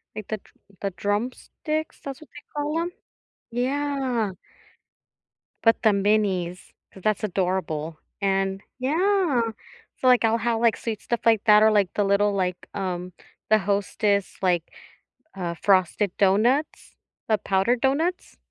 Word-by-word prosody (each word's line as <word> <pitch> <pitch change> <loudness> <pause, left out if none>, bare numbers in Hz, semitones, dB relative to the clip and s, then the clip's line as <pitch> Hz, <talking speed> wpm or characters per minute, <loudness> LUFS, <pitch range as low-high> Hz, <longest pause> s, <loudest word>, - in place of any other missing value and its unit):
like, 215 -2 -6
the 215 - -2
Dr - - -24 0.3
the 200 - 0
Drumsticks, 245 - -3
that's 275 +2 -7
what 295 - -14
they 295 - -12 0.2
call 300 +3 -1
'em? 350 +1 -3 0.6
Yeah. 260 -3 -1 1.3
But 225 0 +4
the 220 - +5
minis, 195 -3 0 0.2
'cause 190 - -14
that's 215 0 +1
adorable, 180 -5 -2 0.2
and 195 0 0 0.2
Yeah. 330 -1 +2 0.6
So 255 - +1
like 250 -2 +5
I'll 225 +1 +3
have, 230 0 0
like, 230 -2 +3
sweet 220 -3 -4
stuff 235 - -2
like 225 -3 +4
that 210 0 +7
or, 220 - +6
like, 200 -4 +2
the 205 - +2
little, 200 +1 +3
like, 180 -2 -2
um, 180 -2 -3 0.4
the 215 - +6
Hostess, 200 0 0
like, 175 -3 +2 0.7
uh, 175 -3 -3
frosted 190 +2 +2
donuts, 230 +10 +1 0.3
the 215 -1 +3
powdered 200 +6 +1
donuts. 320 +7 0
210 Hz, 140 wpm, -25 LUFS, 195-250 Hz, 1.3 s, that